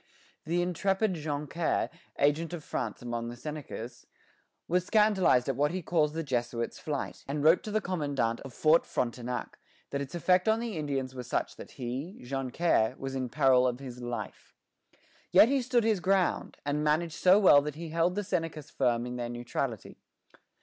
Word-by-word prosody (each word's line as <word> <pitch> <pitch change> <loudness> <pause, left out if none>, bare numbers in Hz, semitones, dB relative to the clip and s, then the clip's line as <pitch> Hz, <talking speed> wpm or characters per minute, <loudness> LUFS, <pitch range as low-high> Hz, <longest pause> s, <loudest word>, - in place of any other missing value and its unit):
The 175 +2 +1
intrepid 195 +3 0
Joncaire, 150 +1 -2 0.3
agent 150 +4 +1
of 165 -3 -5
France 115 -4 -4
among 120 -1 -3
the 120 - -7
Senecas, 130 -3 -7 0.6
was 180 +1 +2
scandalized 195 - +3
at 135 - 0
what 145 +3 +2
he 180 +2 -4
calls 155 -2 +1
the 165 +1 -2
Jesuit's 120 -4 -2
flight, 145 -3 -4
and 145 +1 -2
wrote 160 +3 +6
to - - -7
the 215 +1 0
commandant 145 -10 -1
of 135 - -9
Fort 155 +5 +4
Frontenac 125 0 -3 0.3
that 140 - -2
its 140 +5 -6
effect 180 +4 +3
on 220 +1 +3
the 230 -3 -4
Indians 135 -4 -2
was 125 -2 -7
such - - -2
that - - -11
he, 135 +8 -5
Joncaire, 135 -1 0
was 135 0 -5
in 130 -2 -2
peril 130 -1 +4
of 125 -1 -1
his 125 -2 -8
life. 120 -1 -6 0.7
Yet 225 - +7
he 275 -1 +2
stood 245 -1 +2
his 220 -3 +2
ground, 190 0 +1
and 145 +1 0
managed 155 +2 +1
so 185 +3 +5
well 180 -8 +7
that 150 0 -5
he 165 +1 -7
held 165 +3 +1
the 205 - -1
Senecas 165 -5 -3
firm 120 -3 +1
in 125 0 -5
their 120 -1 -3
neutrality. 120 -1 -4
150 Hz, 175 wpm, -29 LUFS, 125-175 Hz, 0.7 s, Yet